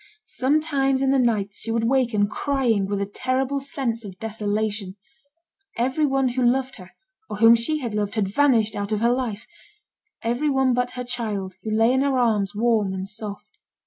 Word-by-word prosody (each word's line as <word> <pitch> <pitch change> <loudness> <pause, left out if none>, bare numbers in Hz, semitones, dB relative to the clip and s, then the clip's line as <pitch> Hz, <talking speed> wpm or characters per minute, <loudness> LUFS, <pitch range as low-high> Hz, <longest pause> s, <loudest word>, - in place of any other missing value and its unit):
Sometimes 275 -1 +1
in 270 - +3
the 270 - +3
nights 210 -5 0
she - - -5
would 225 0 0
waken, 235 -4 +2
crying, 235 -4 0
with 200 0 -2
a - - 0
terrible 260 +6 -1
sense 265 -4 -3
of 195 -3 -9
desolation; 210 -2 -3 0.8
every 265 +6 +1
one 270 -1 +1
who 250 +1 -1
loved 260 +2 +1
her, 185 -3 -12 0.4
or - - -5
whom 225 +2 +7
she 265 +7 0
had 235 -4 -4
loved, 205 0 -2
had 210 -3 +1
vanished 225 -1 +2
out 200 +1 -3
of 215 0 0
her 235 +1 +3
life; 240 -5 -3 0.8
every 240 +6 0
one 265 -2 +2
but 250 0 0
her 250 - -2
child, 215 -6 -3
who 220 - -5
lay 225 +3 +3
in 260 - +2
her 275 -1 +1
arms, 215 -5 +1
warm 215 -3 +1
and 190 +1 -5
soft. 210 -1 -6
230 Hz, 185 wpm, -23 LUFS, 210-265 Hz, 0.8 s, whom